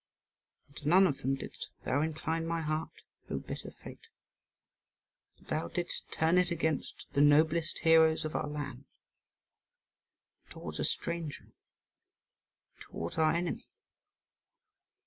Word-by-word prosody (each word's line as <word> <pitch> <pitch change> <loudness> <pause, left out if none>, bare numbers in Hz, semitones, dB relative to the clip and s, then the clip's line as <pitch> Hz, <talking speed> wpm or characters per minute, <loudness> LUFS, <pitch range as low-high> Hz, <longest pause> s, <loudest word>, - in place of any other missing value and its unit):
And 140 - -25
to 145 - -6
none 190 +3 +7
of 145 -7 0
them 135 +2 +1
didst 135 - -7 0.2
thou 140 +3 +2
incline 160 +1 -1
my 165 0 -1
heart, 155 0 -3 0.3
O - - -1
bitter - - -6
fate; - - -12 1.3
but - - -22
thou 155 - -1
didst 175 -1 -3
turn 165 +3 +3
it 180 -1 +2
against 160 -4 -2
the 140 - +3
noblest 155 +3 +4
heroes 160 0 +6
of 155 - -4
our - - 0
land, 145 -3 -5 1.6
and - - -32
towards - - -7
a - - +1
stranger, 170 -3 -3 1.3
towards 85 - -5
our 155 -1 +5
enemy. 170 -1 -2
160 Hz, 125 wpm, -32 LUFS, 145-165 Hz, 1.6 s, none